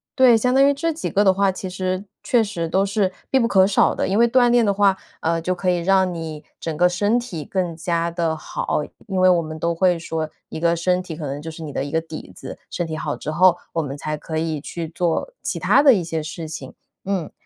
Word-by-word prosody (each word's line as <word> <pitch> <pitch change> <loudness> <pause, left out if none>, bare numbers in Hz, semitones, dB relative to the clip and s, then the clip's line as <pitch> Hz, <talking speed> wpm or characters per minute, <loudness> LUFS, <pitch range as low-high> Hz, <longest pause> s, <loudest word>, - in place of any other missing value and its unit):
对， 255 -4 +6
相 250 +3 +1
当 275 +1 +6
于 285 - +4
这 325 +3 -1
几 320 - -4
个 205 - +2
的 190 - +6
话 195 0 +2
其 185 0 -6
实 185 +2 -3 0.2
确 240 - +3
实 200 -6 -3
都 190 +3 +2
是 200 -1 0 0.2
必 265 - +3
不 235 - +3
可 195 -4 +4
少 200 - +3
的。 - - -1
因 195 +2 0
为 235 - +6
锻 245 0 +4
炼 240 -2 +4
的 200 - +2
话， 195 -1 +3 0.2
呃， 165 +1 0
就 180 +2 0
可 180 +1 -1
以 180 -1 +2
让 190 +1 +2
你 160 -2 -6
整 165 -2 -4
个 180 - +5
身 205 +6 +1
体 180 -11 -6
更 180 0 -2
加 170 0 -1
地 170 -1 -1
好， 155 -1 -2 0.3
因 190 -2 -3
为 185 0 +6
我 175 -2 +4
们 155 -1 -7
都 170 0 0
会 175 -1 +2
说， 160 -1 -3 0.2
一 - - -7
个 170 0 +3
身 180 +2 0
体 160 -3 -7
可 150 -4 -5
能 140 +2 -4
就 160 +1 -6
是 160 +1 -9
你 150 -2 -7
的 135 - -1
一 145 - -6
个 160 - +2
底 160 -1 -9
子， - - -9
身 175 -2 -3
体 160 - -4
好 150 -2 -3
之 - - -6
后 175 +3 +4 0.2
我 165 - 0
们 140 -1 -5
才 155 +2 -3
可 160 +1 -5
以 160 -2 -2
去 165 0 -5
做 175 - -1
其 - - -3
它 280 - +4
的 275 -4 +8
一 195 - +1
些 160 -1 -3
事 160 +1 -6
情， 160 +1 -8 0.3
嗯。 190 -5 -2
180 Hz, 280 characters per minute, -22 LUFS, 160-200 Hz, 0.3 s, 的